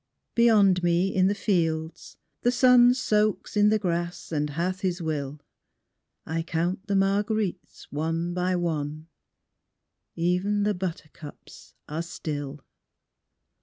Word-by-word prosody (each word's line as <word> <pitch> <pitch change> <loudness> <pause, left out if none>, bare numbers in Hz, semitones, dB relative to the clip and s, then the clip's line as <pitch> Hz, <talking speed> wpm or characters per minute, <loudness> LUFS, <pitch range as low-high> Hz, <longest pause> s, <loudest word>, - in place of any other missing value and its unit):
Beyond 210 -6 +4
me 175 +2 +1
in 185 0 +3
the 200 - +1
fields 165 -6 -2 0.2
the 245 - +3
sun 250 0 +6
Soaks 215 -5 0
in 210 0 +5
the 215 - +3
grass 175 -3 -3
and 150 -1 -1
hath 175 +5 -2
his 185 -2 -1
will; 150 -3 -3 0.9
I 165 +1 -2
count 175 +4 -2
the 200 - 0
marguerites 200 0 -1
one 165 +3 -2
by 180 +1 0
one; 155 -2 -3 1.1
Even 180 +5 0
the 210 0 +1
buttercups 165 -5 -8
are 155 +2 -3
still. 145 -4 -5
180 Hz, 120 wpm, -26 LUFS, 160-200 Hz, 1.1 s, sun